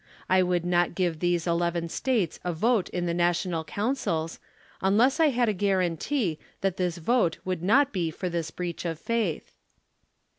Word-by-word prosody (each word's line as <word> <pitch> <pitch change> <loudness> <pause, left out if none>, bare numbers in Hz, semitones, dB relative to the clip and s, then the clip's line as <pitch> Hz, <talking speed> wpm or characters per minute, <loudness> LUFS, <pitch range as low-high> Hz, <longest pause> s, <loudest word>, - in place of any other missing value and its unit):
I 185 0 +4
would 180 -1 0
not 175 0 +1
give 175 -4 0
these 175 -1 +1
eleven 170 0 0
States 215 - -1
a 180 - -1
vote 220 +4 +1
in 180 -1 -2
the 170 - 0
l!^ational 175 -1 0
councils, 200 -8 -2 0.4
unless 230 +10 +3
I 320 - +6
had 245 -3 +1
a 215 - +2
guaranty 185 - 0 0.2
that 195 -2 0
this 180 -2 -1
vote 175 -1 +1
would 185 -3 -2
not 260 +9 +3
be 175 -4 0
for 180 +4 -4
this 170 -2 -2
breach 175 0 -5
of 165 -2 -3
faith. 220 -3 -2
180 Hz, 170 wpm, -27 LUFS, 170-205 Hz, 0.4 s, I